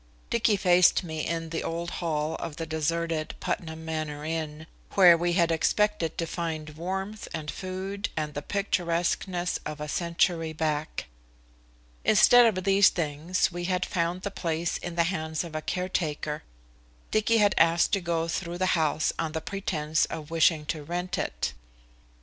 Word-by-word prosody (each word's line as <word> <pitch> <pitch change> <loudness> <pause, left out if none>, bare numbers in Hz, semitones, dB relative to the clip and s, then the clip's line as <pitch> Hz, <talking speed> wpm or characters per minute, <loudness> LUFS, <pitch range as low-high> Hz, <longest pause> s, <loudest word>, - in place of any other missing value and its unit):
Dicky 225 -3 +3
faced 180 -1 +5
me 160 -2 -4
in 165 -1 -2
the 165 - -2
old 170 +1 -3
hall 155 -2 -1
of 165 -3 -6
the 165 - -4
deserted 160 0 -1
Putnam 160 -1 -4
Manor 155 -2 -4
Inn, 155 -1 -4 0.3
where 180 -3 +8
we 175 +1 0
had 170 -2 +3
expected 205 +1 +1
to 165 - 0
find 160 -2 -4
warmth 190 +6 -4
and 150 -2 -4
food 190 +2 -4
and 150 -1 -2
the 145 - -4
picturesqueness 175 -1 -1
of 155 0 -6
a 150 - -4
century 170 0 0
back. 155 -1 -2 1.0
Instead 240 +4 +7
of 185 - -2
these 195 +1 +6
things 165 +3 -1
we 175 0 -4
had 180 0 0
found 175 0 -1
the 200 - -3
place 170 -2 -2
in 175 -1 -6
the 170 - +3
hands 160 -3 -2
of 170 -2 -9
a 155 - -2
caretaker. 155 -4 -2 0.7
Dicky 215 +1 +3
had 205 -2 +4
asked 170 0 +4
to 195 - +2
go 165 -1 -1
through 170 +1 -3
the 185 0 +2
house 155 0 +1
on 160 -2 -2
the 160 - -1
pretence 155 -6 -1
of 155 0 -7
wishing 160 -2 +3
to 150 +1 -3
rent 175 +4 -3
it. - - -2
170 Hz, 160 wpm, -27 LUFS, 155-180 Hz, 1.0 s, where